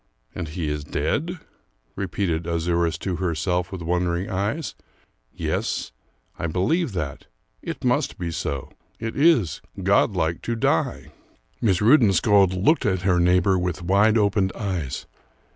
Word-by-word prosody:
"And 90 -3 -4
he 80 +1 -4
is 75 0 -2
dead?" 150 - -2 0.6
repeated 90 -4 -2
Azouras 85 0 0
to 90 -3 -2
herself 90 +1 -1
with 95 -3 -6
wondering 90 +2 -1
eyes. 105 - -2 0.6
"Yes, - - -2 0.5
I 85 - -1
believe 105 - 0
that; 75 -6 -4 0.3
it - - -6
must - - +1
be 85 -2 -3
so: 70 -4 -4 0.3
it 115 0 -4
is 140 - +3 0.2
godlike 80 +1 +2
to 120 - -2
die!" 95 -7 0 0.5
Miss 95 -5 +2
Rudensköld 105 - +5
looked 155 -1 +3
at 95 -2 0
her 90 -2 +3
neighbor 90 +2 +3
with 90 0 -2
wide 100 +5 +4
opened 100 -2 +2
eyes. 90 - -3
90 Hz, 130 wpm, -24 LUFS, 85-105 Hz, 0.6 s, Rudensköld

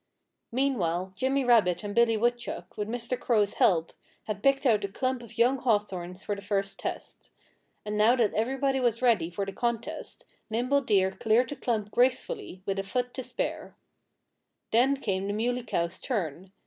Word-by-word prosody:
Meanwhile 190 -9 0
Jimmy 265 +5 +1
Rabbit 215 -7 +4
and 205 0 -4
Billy 235 -1 +4
Woodchuck, 240 +2 -2
with 210 -1 -3
Mr. 240 +2 -3
Crow's 210 -4 +2
help, 165 -3 +3 0.3
had 210 -2 -4
picked 275 +2 +3
out 215 -5 +3
a - - 0
clump 255 +5 -2
of 235 -1 -13
young 250 +3 +3
hawthorns 190 -6 -1
for 205 - -2
the 200 - -9
first 200 -1 -2
test. - - -6 0.6
And 210 0 -2
now 225 +4 +5
that 230 -5 +2
everybody 265 +4 0
was 240 -1 0
ready 215 -10 +3
for 195 +3 -3
the 195 - -6
contest 235 0 -3 0.2
Nimble 250 +5 +1
Deer 195 -6 +2
cleared 225 +5 +2
the 290 - -4
clump 215 -6 -2
gracefully, 255 - 0
with 195 0 -1
a - - -1
foot 245 +5 -2
to 260 - -4
spare. - - -4 1.0
Then 260 +5 +4
came 195 -6 -2
the 200 - -1
Muley 245 +4 0
Cow's 170 -7 -2
turn. 185 - -3
225 Hz, 175 wpm, -28 LUFS, 195-250 Hz, 1.0 s, now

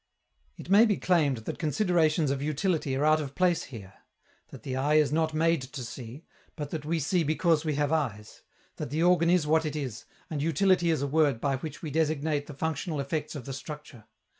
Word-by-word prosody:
It 180 - -8
may 215 +4 +7
be 205 - +1
claimed 145 -10 +1
that - - -5
considerations 160 -2 +2
of 135 -1 -2
utility 150 -1 -1
are 140 +3 +1
out 155 0 +4
of 140 -2 -7
place 175 -2 +2
here; 100 -7 -10 0.5
that - - -12
the 130 - -4
eye 145 +3 +1
is 150 -2 +4
not 160 +1 +1
made 165 -1 +2
to 130 +1 -7
see, 120 +5 -9 0.3
but 145 -3 -6
that 155 -2 -4
we 165 +2 0
see 165 +4 +1
because 160 +1 +2
we 155 -3 -1
have 145 0 0
eyes; 115 -10 -2 0.4
that - - -4
the 155 +3 0
organ 175 -1 +4
is 175 -3 +3
what 160 +1 +3
it 155 -1 -3
is, 130 -7 -5 0.2
and 150 -3 -3
"utility" 175 +3 +2
is 155 -4 +1
a - - 0
word 145 -4 +2
by 135 +1 0
which 155 +3 -8
we 155 - -4
designate 155 -1 0
the 145 - -9
functional 160 +1 -2
effects 150 +3 -3
of 135 -5 -7
the 135 - -5
structure. 150 -4 -9
150 Hz, 215 wpm, -28 LUFS, 140-165 Hz, 0.5 s, may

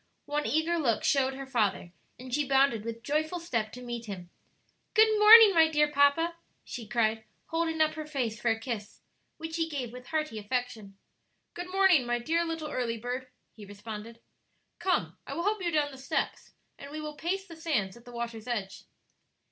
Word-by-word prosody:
One 295 +1 -1
eager 330 +2 +1
look 235 -8 +1
showed 270 -1 +2
her 275 0 -6
father, 215 -8 0 0.3
and 250 +1 -9
she 290 0 +1
bounded 270 -5 +3
with 230 0 -6
joyful 310 +5 -1
step 230 -10 -2
to 250 - -9
meet 240 -1 -6
him. 180 -4 -7 0.6
"Good 435 0 +6
morning, 430 -1 +10
my 325 -2 +6
dear 300 -1 +2
papa," 300 +4 +3 0.3
she 235 -3 -7
cried, 220 0 +1 0.3
holding 325 -1 -1
up 310 0 +3
her 310 -1 -6
face 240 -7 -3
for 235 - +1
a 225 0 +1
kiss, 225 -3 -6 0.4
which 320 0 -5
he 325 -1 0
gave 255 -6 -4
with 250 0 -10
hearty 305 -8 -2
affection. 215 -3 -4 0.6
"Good 355 +1 -6
morning, 375 -9 +4
my 240 0 +1
dear 325 +8 0
little 325 -2 -4
early 235 -3 -2
bird," 250 +3 -4 0.3
he 215 - -12
responded. 210 +3 -9 0.6
"Come, 375 - 0
I - - -5
will 340 - -2
help 415 +1 0
you 350 - 0
down 300 -3 +1
the 265 - -11
steps 265 - -3 0.3
and 280 - -9
we 305 +2 -6
will 305 0 -5
pace 375 +5 -2
the 335 - -11
sands 275 - -1
at 235 - -15
the 245 - -12
water's 235 -1 -6
edge." 210 -6 -4
270 Hz, 190 wpm, -29 LUFS, 230-320 Hz, 0.6 s, morning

